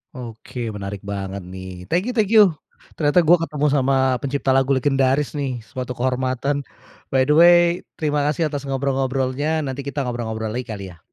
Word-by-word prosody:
Oke 120 -1 -6
menarik 100 -1 -6
banget 100 -1 -4
nih 95 -1 -8
thank 175 - 0
you - - -2
thank 210 -1 +2
you, 210 -4 +8 0.5
ternyata 155 +3 +3
gua 170 +2 +5
ketemu 150 -1 -2
sama 135 -1 +2 0.2
pencipta 140 0 -2
lagu 135 +1 +2
legendaris 135 +1 +2
nih 130 -4 -3
suatu 125 +3 -6
kehormatan, 130 +2 -1 0.6
by 130 - +4
the 150 - +5
way 175 0 +8 0.3
terima 150 -2 -1
kasih 155 +1 0
atas 145 -1 -5
ngobrol-ngobrolnya 135 +2 -1
nanti 135 -1 -5
kita 140 0 -3
ngobrol-ngobrol 110 -3 -3
lagi 125 +1 -3
kali 105 -3 -6
ya. 85 -2 -15
135 Hz, 165 wpm, -21 LUFS, 120-145 Hz, 0.6 s, you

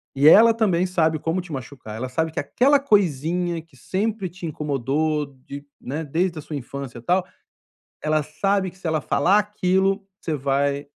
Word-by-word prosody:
E 140 +2 +4
ela 225 +7 +8
também 190 -6 +2
sabe 160 -4 +1
como 165 +4 -1
te 175 -1 -12
machucar, 130 -4 -7
ela 125 +3 -4
sabe 160 +5 -1
que 160 - -3
aquela 280 +3 +3
coisinha 175 - +1
que 160 -4 -23
sempre 200 - -2
te 175 +1 -9
incomodou 150 0 -1 0.2
de 140 +1 -8
né, 150 +5 -4
desde 170 +4 -1
a - - -6
sua 150 - -7
infância, 135 -2 -7
tal, 180 +9 +2 0.8
ela 155 0 +1
sabe 190 +5 0
que 185 - -22
se 190 - -8
ela 160 -1 +1
falar 185 +8 +3
aquilo 195 -1 +1
você 160 - -2
vai 140 +1 0
160 Hz, 175 wpm, -23 LUFS, 145-190 Hz, 0.8 s, ela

